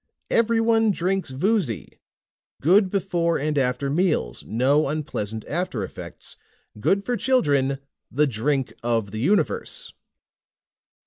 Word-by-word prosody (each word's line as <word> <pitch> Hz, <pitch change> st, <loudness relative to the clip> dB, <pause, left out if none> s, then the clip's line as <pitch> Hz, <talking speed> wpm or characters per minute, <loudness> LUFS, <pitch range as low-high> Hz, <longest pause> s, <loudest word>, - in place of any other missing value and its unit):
EVERYONE 225 Hz, -1 st, +3 dB
DRINKS 190 Hz, -2 st, 0 dB
VOOZY. 150 Hz, -, -1 dB, 0.6 s
GOOD 185 Hz, +6 st, +4 dB
BEFORE 175 Hz, -4 st, 0 dB
AND 150 Hz, +2 st, -1 dB
AFTER 130 Hz, 0 st, 0 dB
MEALS, 155 Hz, -, 0 dB
NO 135 Hz, +7 st, +2 dB
UNPLEASANT 110 Hz, -8 st, -3 dB
AFTER 155 Hz, -, -2 dB
EFFECTS. 95 Hz, -, -9 dB, 0.4 s
GOOD 195 Hz, -, +1 dB
FOR 245 Hz, -, 0 dB
CHILDREN! 145 Hz, -, +2 dB, 0.3 s
THE 150 Hz, +4 st, +3 dB
DRINK 135 Hz, +2 st, -1 dB
OF 115 Hz, -4 st, 0 dB
THE 110 Hz, -, -5 dB
UNIVERSE!" 465 Hz, -, 0 dB
150 Hz, 110 wpm, -24 LUFS, 130-200 Hz, 0.6 s, GOOD